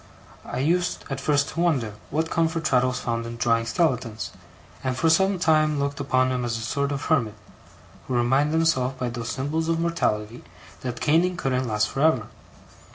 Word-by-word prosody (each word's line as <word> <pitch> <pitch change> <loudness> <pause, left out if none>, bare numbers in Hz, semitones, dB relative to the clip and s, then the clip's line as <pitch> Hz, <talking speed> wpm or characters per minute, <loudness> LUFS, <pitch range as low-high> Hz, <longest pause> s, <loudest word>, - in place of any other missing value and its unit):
I - - -5
used 175 +6 0
at 135 - -3
first 145 -2 +2
to - - -6
wonder 140 -11 +1 0.2
what 160 +2 -1
comfort 165 0 0
Traddles 125 -3 +2
found 115 -1 -2
in 115 0 -7
drawing 115 -1 +1
skeletons; 125 -5 -1 0.5
and 130 -1 -1
for 160 +2 +3
some 190 +4 +3
time 155 -3 +3
looked 140 0 -2
upon 130 -2 +2
him 125 -1 -1
as 115 -1 -1
a - - -5
sort 140 +5 -1
of 140 0 -3
hermit, 115 -9 +1 0.7
who 130 - -1
reminded 135 +5 +2
himself 135 -6 +1
by 125 -1 -2
those 120 -1 -5
symbols 155 +5 -2
of 165 0 +1
mortality 120 -10 -1 0.4
that 125 -2 -5
caning 170 +4 +2
couldn't 130 -5 -1
last 105 -1 +1
for 135 - -4
ever. 130 -9 +3
135 Hz, 180 wpm, -24 LUFS, 120-160 Hz, 0.7 s, for